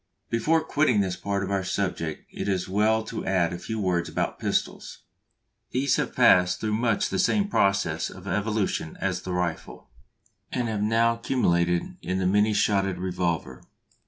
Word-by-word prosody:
Before 155 +8 +2
quitting 145 -8 +2
this 95 -2 -1
part 100 +1 -2
of 95 - -4
our 100 -1 0
subject 90 -5 -3
it - - -4
is 95 -3 0
as - - -10
well 110 +3 +2
to - - -5
add 90 -3 +1
a 85 - -5
few 110 +3 -4
words 90 -4 0
about - - -2
pistols. - - -2 0.7
These 130 +1 +1
have - - -2
passed 90 0 +5
through 110 -1 -1
much 115 -1 +1
the - - -2
same 200 +2 +2
process 100 - +1
of - - -12
evolution 105 -4 -1
as 95 -2 -1
the 95 - -6
rifle, 85 -7 -4 0.6
and 125 -2 -1
have 105 -2 -2
now 115 +2 +2
culminated 85 -8 0
in 95 +1 -2
the 95 - 0
many 105 +3 +3
shotted 100 -3 +1
revolver. 90 -2 -2
100 Hz, 170 wpm, -26 LUFS, 90-110 Hz, 0.7 s, passed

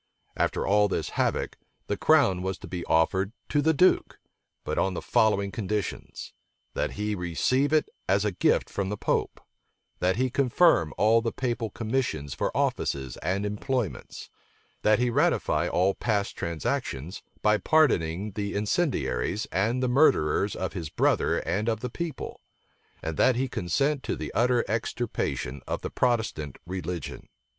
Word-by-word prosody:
After - - 0
all 105 +1 +4
this - - -2
havoc, - - -1 0.3
the 100 - -1
crown 100 -7 +3
was 95 0 -2
to 95 - -10
be 85 0 -5
offered 95 +5 +2 0.2
to 145 - +2
the 160 - +3
duke, 180 +5 +3 0.5
but - - -2
on 95 -1 +1
the - - -2
following 100 -2 +2
conditions: 105 -2 -4 0.4
that - - -2
he 105 +1 -2
receive 105 - +1
it 155 -1 +3 0.2
as 100 +2 +3
a 105 - +1
gift 90 - +2
from 100 -1 -3
the 105 - -3
pope; - - -1 0.6
that 90 +1 +2
he 130 +1 0
confirm 135 - +3
all 110 +2 +4
the 115 0 -1
papal 120 -3 -2
commissions 110 - -2
for - - -1
offices 65 -3 -1
and 95 +3 -1
employments; 110 +2 -3 0.5
that 105 0 +4
he 125 0 +1
ratify - - +2
all 95 +2 +2
past 105 -3 -1
transactions, 80 0 -3 0.2
by 105 0 +4
pardoning 105 - +2
the 100 +1 -4
incendiaries, 105 - 0
and 115 +8 +1
the - - +2
murderers 115 - +3
of 95 - -3
his 85 -5 -5
brother - - +2
and 105 +7 0
of 110 -2 -1
the 125 - -4
people; 170 +3 -5 0.6
and 80 -1 -3
that 130 - +4
he 130 +2 0
consent 135 - 0
to - - -2
the - - -5
utter 120 +1 +2
extirpation 110 - -2
of - - -3
the - - -4
Protestant 110 - 0
religion. 90 -1 -5
105 Hz, 155 wpm, -27 LUFS, 90-125 Hz, 0.6 s, all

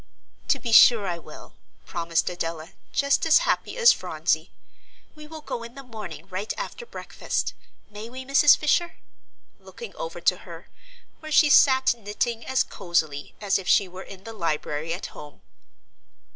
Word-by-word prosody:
"To - - +2
be 235 - -5
sure 225 -1 +7
I 170 -2 -3
will," - - -14 0.3
promised 165 -1 -1
Adela, 165 -1 -4 0.2
just 280 0 +1
as 320 - +7
happy - - -1
as 475 -1 +7
Phronsie; - - -2 0.6
"we 305 0 -12
will 315 0 -9
go 240 - -5
in 235 +1 -10
the 275 - -9
morning 200 - -9
right 195 +4 -4
after - - -6
breakfast. - - -4 0.3
May 210 +2 -9
we, 260 +2 -8
Mrs. 275 +2 +6
Fisher?" 335 +3 +1 0.6
looking 470 - -11
over - - -6
to - - +2
her, - - -12 0.5
where 310 -1 -9
she 295 -1 +5
sat 265 -2 +5
knitting 225 +2 -3
as 260 0 +2
cosily 160 -6 -2
as 200 -2 +1
if 185 - -9
she 200 - +4
were 185 +1 -10
in 190 0 -12
the 225 - -8
library 155 -4 -3
at 175 +3 -4
home. 150 -1 -12
220 Hz, 160 wpm, -25 LUFS, 175-280 Hz, 0.6 s, sure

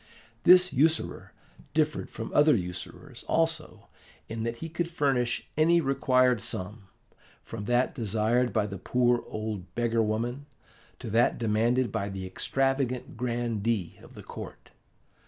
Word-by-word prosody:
This 180 +1 +7
usurer 155 +5 +1 0.4
differed 155 -1 0
from - - -7
other 150 0 +5
usurers 95 +7 -6
also 165 -1 -1 0.4
in 115 0 -5
that 115 +1 -2
he 165 - -6
could 170 +1 -3
furnish 135 -7 0
any 165 +3 +4
required 130 -4 +2
sum, 105 -2 -5 0.6
from 110 -3 -7
that 120 +3 +1
desired 115 +1 +1
by 110 -2 +1
the 100 -2 -6
poor 120 +2 +2
old 105 -5 -5
beggar 115 -1 +1
woman 120 +6 -2 0.5
to 115 - -7
that 115 +3 +3
demanded 115 +2 +1
by 100 -2 -2
the 95 -1 -5
extravagant 135 +6 -1
grandee 115 -5 -2
of - - -15
the - - -10
court. - - -10
120 Hz, 135 wpm, -28 LUFS, 110-135 Hz, 0.6 s, This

